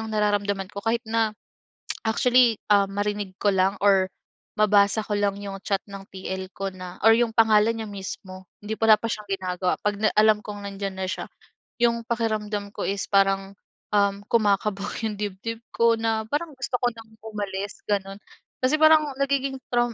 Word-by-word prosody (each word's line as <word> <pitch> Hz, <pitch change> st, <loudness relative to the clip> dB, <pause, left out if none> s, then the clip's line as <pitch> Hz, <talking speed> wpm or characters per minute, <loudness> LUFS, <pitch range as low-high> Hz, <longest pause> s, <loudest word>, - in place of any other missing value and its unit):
ang 220 Hz, 0 st, -5 dB
nararamdaman 205 Hz, -2 st, 0 dB
ko 200 Hz, -, -7 dB
kahit 230 Hz, +1 st, +1 dB
na 225 Hz, -1 st, +1 dB, 0.7 s
actually 240 Hz, 0 st, +4 dB
ah, 200 Hz, -1 st, +5 dB
marinig 205 Hz, -1 st, -3 dB
ko 205 Hz, -, +4 dB
lang 190 Hz, +1 st, +2 dB
or 195 Hz, -2 st, +5 dB, 0.5 s
mabasa 205 Hz, 0 st, +4 dB
ko 210 Hz, -, -1 dB
lang 200 Hz, -1 st, +1 dB
'yung 200 Hz, -1 st, -6 dB
chat 195 Hz, -1 st, 0 dB
ng 195 Hz, -1 st, -9 dB
TL 190 Hz, 0 st, -5 dB
ko 195 Hz, 0 st, -3 dB
na 180 Hz, -1 st, -9 dB
or 225 Hz, -, +8 dB
'yung 235 Hz, -1 st, +1 dB
pangalan 220 Hz, -1 st, +5 dB
niya 220 Hz, -1 st, -5 dB
mismo 190 Hz, -1 st, -8 dB, 0.2 s
hindi 215 Hz, +1 st, -4 dB
wala 220 Hz, -1 st, +7 dB
pa 230 Hz, -, -2 dB
siyang 210 Hz, -, -4 dB
ginagawa 185 Hz, -1 st, -1 dB
'pag 205 Hz, 0 st, 0 dB
na 215 Hz, -, +4 dB
alam 215 Hz, 0 st, +5 dB
kong 205 Hz, -1 st, -7 dB
nandiyan 195 Hz, 0 st, -4 dB
na 190 Hz, -, -2 dB
siya -, -, -3 dB, 0.6 s
'yung 235 Hz, -1 st, +2 dB
pakiramdam 215 Hz, -3 st, -2 dB
ko -, -, -3 dB
is 195 Hz, -1 st, -1 dB
parang, 195 Hz, 0 st, +2 dB, 0.4 s
um, 200 Hz, 0 st, +2 dB
kumakabog 205 Hz, -2 st, +1 dB
'yung 215 Hz, -1 st, -2 dB
dibdib 210 Hz, +3 st, -4 dB, 0.2 s
ko 230 Hz, 0 st, +4 dB
na 225 Hz, -1 st, 0 dB
parang 305 Hz, +1 st, -2 dB
gusto 260 Hz, -1 st, -2 dB
ko 245 Hz, -, +2 dB
nang 225 Hz, -1 st, -13 dB
umalis 205 Hz, -2 st, -5 dB
gano'n. 195 Hz, -1 st, -1 dB, 0.5 s
Kasi 265 Hz, +4 st, +3 dB
parang 310 Hz, -2 st, +6 dB
nagiging 275 Hz, -1 st, 0 dB
traum 240 Hz, -1 st, +1 dB
210 Hz, 175 wpm, -25 LUFS, 195-225 Hz, 0.7 s, or